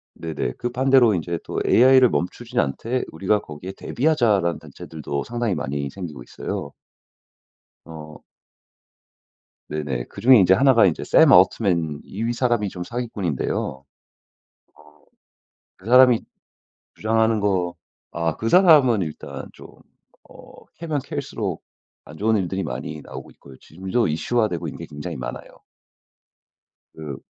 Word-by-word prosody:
네네. 80 -2 -4
그 120 - -3
반대로 130 -2 +4
이제 85 -1 -2
또 - - -4
"AI를 130 +1 +6
멈추진 90 -3 -3
않되 115 - -1
우리가 95 +6 0
거기에 90 +1 -9
대비하자."라는 115 - +1
단체들도 75 -3 -6
상당히 120 -3 -2
많이 70 -2 -3
생기고 80 -9 -8
있어요. - - -6 1.1
어. 75 -2 -11 1.5
네네. 70 -5 -3
그중에 130 -1 +4
이제 95 -1 +5
1 135 +7 +4
가 115 - +5
이제 85 -5 0
샘 - - +5
올트먼 85 -8 +3
이 110 +4 -5
이 - - +1
사람이 120 -4 0
좀 90 -1 -7
사기꾼인데요. 105 - -3 0.3
어 - - -45 1.9
그 90 - -20
사람이 125 -1 +6 0.7
주장하는 110 0 +1
거 95 -4 0 0.4
아 85 -2 -1
그 115 - -3
사람은 150 - +5
일단 80 -3 -7
좀 - - -13 0.6
어 - - -16
캐면 160 -3 -3
캘수록 125 - -4 0.4
안 75 - -13
좋은 110 +1 +2
일들이 95 0 -2
많이 75 0 -6
나오고 - - -10
있고요. 70 -2 -16
지금도 95 +7 -2
이슈화되고 90 +4 -1
있는 - - -7
게 - - -8
굉장히 75 0 -7
많아요. 65 0 -6 1.5
그 75 -4 -7
95 Hz, 280 characters per minute, -22 LUFS, 80-120 Hz, 1.9 s, AI를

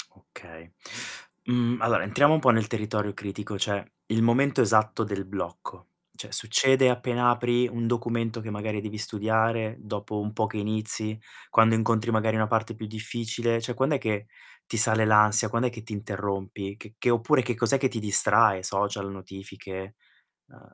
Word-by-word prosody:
Okay. 85 0 -16 0.7
Mhmm, 125 -1 0
allora, 115 +1 +2
entriamo 140 +9 +4
un 160 - +3
po' 135 - +4
nel 115 -3 +3
territorio 105 -2 -2
critico, 105 +1 -6
cioè 100 0 -2 0.2
il 110 +1 +1
momento 125 +4 +3
esatto 110 0 +3
del 100 -2 -4
blocco. 95 -3 -7 0.3
Cioè - - -9
succede 130 +3 +3
appena 125 0 +1
apri 120 0 +2
un 115 -1 -4
documento 115 -1 -1
che 110 - -7
magari 105 0 -3
devi 110 0 -6
studiare, 110 +1 0
dopo 105 0 -5
un 105 +1 -4
po' 110 0 0
che 110 - -7
inizi, 110 +1 -2 0.3
quando 115 0 +5
incontri 115 +1 +1
magari 110 0 +1
una 110 -1 +1
parte 110 +1 0
più 110 0 -7
difficile, 115 +2 -2
cioè 120 +2 -3
quand'è 140 +3 +1
che 105 -4 -2 0.4
ti 115 - -4
sale 110 0 +4
l'ansia, 105 +1 +5
quand'è 115 +3 0
che 115 -2 -10
ti 110 -1 -8
interrompi? 100 -1 -4
Che 110 -1 -13
che - - 0
oppure 120 +4 +3
che 120 +1 -2
cos'è 120 +4 +2
che 135 0 +1
ti 120 - -4
distrae? 105 -1 +4
Social, 100 +1 -2
notifiche? 95 +1 -9 0.5
Uhm - - -21
110 Hz, 170 wpm, -26 LUFS, 105-115 Hz, 0.7 s, quando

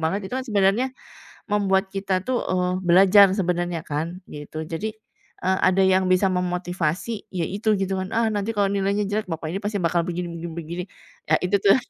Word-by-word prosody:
banget, 190 +5 -1
itu - - -4
kan 260 - -4
sebenarnya, 210 +4 +2 0.6
membuat 195 -1 +2
kita 195 -1 -1
tuh, 255 -1 0
eee, 180 0 +1
belajar 195 +3 +7
sebenarnya 175 -2 -1
kan, 165 +5 -4
gitu. 150 +1 -6
Jadi, 185 +7 -3 0.5
eee, 190 0 +2
ada 190 +1 +4
yang 190 0 +3
bisa 185 +1 +3
memotivasi, 180 +2 -2
ya 175 -2 0
itu 205 +5 0
gitu, 195 0 -1
kan. 185 - -4
"Ah 230 -1 +3
nanti 205 +2 -1
kalau 200 -1 +3
nilainya 200 +1 0
jelek, 215 +1 -1
bapak 160 -1 -4
ini 195 - -2
pasti 205 0 -2
bakal 170 +1 +2
begini 175 0 -3
begini 170 0 -6
begini." 170 +2 -5 0.4
Ya - - +5
itu 185 +3 +3
tuh, 195 - +6
190 Hz, 185 wpm, -23 LUFS, 175-200 Hz, 0.6 s, belajar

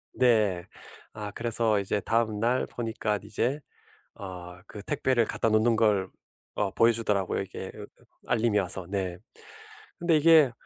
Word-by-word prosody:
네. 110 -7 +2 0.5
아 105 -1 -6
그래서 115 -1 +1
이제 100 +1 -1
다음날 115 +2 0
보니까 110 -3 -2
이제 115 +7 -1 0.6
어 90 -2 -9
그 105 - -9
택배를 120 +3 +1
갖다 115 - -1
놓는 110 +1 +3
걸 105 -4 +2 0.5
어 100 -2 +1
보여주더라고요 110 -4 +2
이게 - - -7
어 - - -9 0.4
알림이 115 -3 +2
와서. 95 -1 -1
네. 95 -3 -3 0.8
근데 170 -3 +2
이게 155 -3 +6
110 Hz, 260 characters per minute, -27 LUFS, 100-120 Hz, 0.8 s, 이게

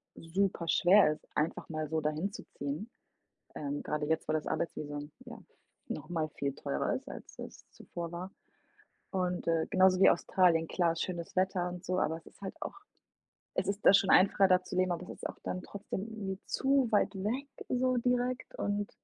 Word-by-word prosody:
super 175 0 -1
schwer 180 -3 +6
ist, - - -14
einfach 155 +2 -1
mal 155 -1 -3
so 160 -1 0
dahin 155 +6 -1
zu - - -8
ziehen, 145 - -4 0.7
ähm, 145 -1 -3
grade 150 0 -2
jetzt, 160 0 0
wo - - +2
das 155 -1 -1
Arbeitsvisum 145 -3 -3
ja - - -8 0.5
noch 155 0 -5
mal 160 -3 -1
viel 140 -1 -3
teurer 70 - -1
ist, - - -5
als - - -10
es - - -10
zuvor 170 -1 -7
war. 180 +2 -5 0.8
Und, 180 -2 -1
äh, 165 -1 +2
genauso 185 -1 +5
wie - - +8
Australien 165 -3 +3
klar 170 -2 +1
schönes 170 0 -4
Wetter 185 -1 +1
und 180 +1 -7
so, 185 0 0
aber 160 +1 0
es 165 - -16
ist - - -18
halt 195 - -5
auch - - -5 0.8
es - - -1
ist 200 +1 -2
da - - +9
schon 195 -1 +5
einfacher, 195 +1 +6
da 185 0 +4
zu 180 0 -5
leben, 185 -1 +3
aber 175 - -5
es - - -11
ist - - -5
auch - - -9
dann 185 - -3
trotzdem 195 -1 -5
irgendwie 195 -3 -5
zu 270 -2 +2
weit 205 -1 +3
weg 235 +9 -2 0.2
so 255 0 +1
direkt 250 +1 0
und 205 0 -1
180 Hz, 190 wpm, -32 LUFS, 160-200 Hz, 0.8 s, da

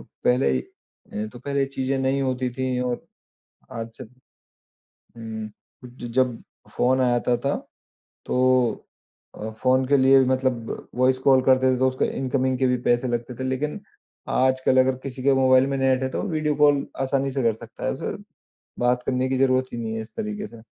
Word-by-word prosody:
पहले 70 - 0 0.5
अ, 105 +1 -3
तो 120 - -10
ख़ैर 140 +2 -4
ये 135 - +3
चीज़ें 135 0 -2
नहीं 135 +1 +1
होती 130 -1 -1
थी 130 -1 -1
और 125 -1 -2 0.7
आज 115 0 -5
से - - -7 0.9
हुँ। 110 -1 -8 0.4
ज 120 0 -9
जब 125 -3 +2 0.4
फ़ोन 130 +1 +3
आया 120 -1 +3
था 125 - +4
ता 140 - +1 0.7
तो - - -1 1.0
अ, 110 +1 -6
फ़ोन 130 0 +3
के 140 - +5
लिए 135 0 +6
मतलब 130 -3 -1
वॉइस 130 +1 +2
कॉल 130 -1 +6
करते 130 0 +4
थे 125 - -3
तो 130 - +3
उसके 130 0 -1
इनकमिंग 130 -1 0
के 130 - +2
भी 125 0 +2
पैसे 120 +1 +2
लगते 120 +1 -3
थे। 130 - -2
लेकिन 150 +8 -2 0.5
आजकल 130 0 +2
अगर 130 0 +2
किसी 130 -1 -6
के 135 +1 +4
मोबाइल 130 0 +5
में 140 0 -1
नेट 130 -1 +2
है 130 - 0
तो - - -3
वीडियो 155 -2 0
कॉल 145 -1 +4
आसानी 135 0 0
से 135 0 -1
कर 115 -1 +3
सकता 110 - -11
है। - - +1
उसे - - -4 0.6
बात 125 0 +2
करने 130 0 0
की 130 0 0
ज़रूरत 130 -1 +3
ही 120 - -5
नहीं 110 -1 -3
है 110 - -3
इस 110 - -13
तरीके 210 -1 -4
से। 115 -1 -13
130 Hz, 190 wpm, -24 LUFS, 125-135 Hz, 1.0 s, लिए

